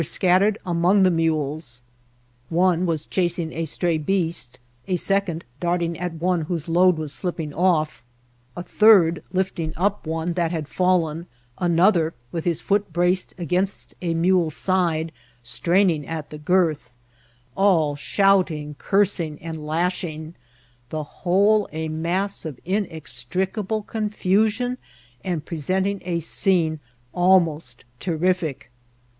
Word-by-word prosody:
scattered 190 +6 +2
among 180 +3 +3
the 185 - +5
mules: 155 -6 -1 0.7
one 180 +1 +2
was 160 -2 -1
chasing 175 -3 -1
a 165 0 -2
stray 165 +1 -1
beast; 165 -6 -2 0.3
a 185 - +1
second 185 -2 -1
darting 170 -1 0
at 180 -1 -3
one 175 +1 0
whose 165 0 -4
load 180 +1 +4
was 155 -2 -4
slip* 180 -2 -2
ping 155 -3 -5
off; 165 -6 +1 0.5
a 175 - -4
third 180 -7 +5
lifting 185 -4 -2
up 195 -1 -1
one 165 +2 -2
that 170 -1 0
had 160 -3 -3
£allen; 170 -1 0 0.3
an 170 -2 +1
other, 170 -4 +3 0.2
with 165 -2 -4
his 170 -3 0
foot 205 0 0
braced 180 +1 +1
against 180 +3 -2
a 170 -2 -1
mule's 170 -2 +2
side, 170 -4 +1 0.3
straining 170 +5 +1
at 160 -2 -5
the 150 - -8
girth; 155 -6 0 0.6
all 165 -7 +3
shouting, 170 -3 +1
cursing, 190 -6 0
and 160 -2 -7
lash 175 +4 0
ing: 160 -1 -6 0.6
the 155 -1 -3
whole 200 +7 +2
a 160 +1 -4
mass 175 +6 -2
of 150 -6 -7
inextricable 185 - -2
confusion, 215 +4 0 0.4
and 175 -6 -3
presenting 190 +5 -1
a 175 -2 -1
scene 165 -2 +1 0.3
almost 165 -9 +2
terrific. 175 -5 -1
175 Hz, 125 wpm, -23 LUFS, 160-185 Hz, 0.7 s, the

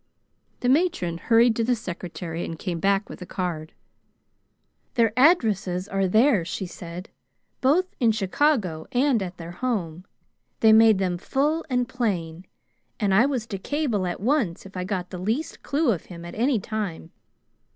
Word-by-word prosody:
The 245 - 0
matron 255 - +1
hurried 230 +2 +4
to 230 - +1
the 245 +2 +2
secretary 175 -4 -6
and 165 - -5
came 175 0 -4
back 195 +3 +1
with - - -10
a - - -6
card. 170 -4 -4 1.2
"Their 230 -3 +3
addresses 215 - +3
are 195 -2 0
there," 220 0 +4
she 190 +3 -4
said. 175 0 -8 0.5
"Both 300 +8 +3
in 235 -4 +4
Chicago 205 - 0
and 250 -2 +2
at 185 -1 -5
their 170 0 -8
home. 180 -6 -3 0.6
They 220 -1 +7
made 220 -1 +7
them 180 -2 -1
full 300 - 0
and 250 -2 +1
plain, 185 -9 -3 0.5
and 205 -4 +1
I 225 +7 +5
was 255 -6 -2
to 200 -4 -6
cable 240 -7 -1
at 175 - -4
once 225 - 0
if 195 - -13
I 180 0 -3
got 185 -2 -3
the 180 - -6
least 225 - -2
clue 285 -2 +1
of 180 - -3
him 170 -2 -10
at 175 - -8
any 245 +1 +1
time. 195 -6 -5
205 Hz, 165 wpm, -25 LUFS, 180-245 Hz, 1.2 s, They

